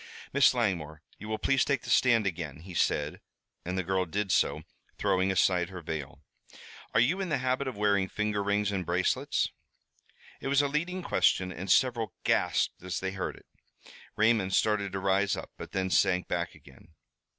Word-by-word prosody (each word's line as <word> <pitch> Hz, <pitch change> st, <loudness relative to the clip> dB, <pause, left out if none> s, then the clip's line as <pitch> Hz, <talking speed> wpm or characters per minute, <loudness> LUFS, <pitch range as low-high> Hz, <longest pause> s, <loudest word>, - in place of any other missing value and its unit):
"Miss 140 Hz, -1 st, +5 dB
Langmore, 85 Hz, -10 st, -1 dB, 0.2 s
you 105 Hz, -, -8 dB
will 110 Hz, -, -1 dB
please 135 Hz, +2 st, +2 dB
take 140 Hz, -1 st, 0 dB
the 120 Hz, -, -4 dB
stand 120 Hz, -4 st, +4 dB
again," 80 Hz, -6 st, -4 dB
he 90 Hz, +2 st, -10 dB
said, 75 Hz, -3 st, 0 dB, 0.4 s
and 90 Hz, +2 st, -3 dB
the 95 Hz, -, 0 dB
girl 95 Hz, +1 st, 0 dB
did 100 Hz, +3 st, -2 dB
so, -, -, +2 dB, 0.3 s
throwing 95 Hz, +1 st, +1 dB
aside 90 Hz, -1 st, +2 dB
her 95 Hz, -1 st, -7 dB
veil. 75 Hz, -4 st, -6 dB, 0.7 s
"Are -, -, +6 dB
you 170 Hz, +12 st, +2 dB
in 190 Hz, -, -3 dB
the -, -, +1 dB
habit 130 Hz, +2 st, -1 dB
of 130 Hz, -, -5 dB
wearing 100 Hz, -2 st, +2 dB
finger 105 Hz, -1 st, -1 dB
rings 100 Hz, +1 st, 0 dB
and 95 Hz, -2 st, -2 dB
bracelets?" 90 Hz, +2 st, 0 dB, 0.9 s
It -, -, -5 dB
was 140 Hz, +1 st, +3 dB
a -, -, +2 dB
leading 170 Hz, +6 st, -2 dB
question 90 Hz, -, +2 dB
and 95 Hz, +2 st, -7 dB
several 120 Hz, -4 st, +2 dB
gasped -, -, +1 dB
as 90 Hz, -1 st, -3 dB
they 95 Hz, 0 st, -3 dB
heard 95 Hz, 0 st, -4 dB
it. -, -, -18 dB, 0.7 s
Raymond 110 Hz, -4 st, +2 dB
started 105 Hz, -2 st, +1 dB
to 95 Hz, -, -2 dB
rise 95 Hz, +1 st, +1 dB
up, -, -, -8 dB
but -, -, -9 dB
then 95 Hz, -1 st, -1 dB
sank 90 Hz, -1 st, +2 dB
back -, -, -2 dB
again. 80 Hz, -, -18 dB
100 Hz, 185 wpm, -29 LUFS, 90-120 Hz, 0.9 s, Are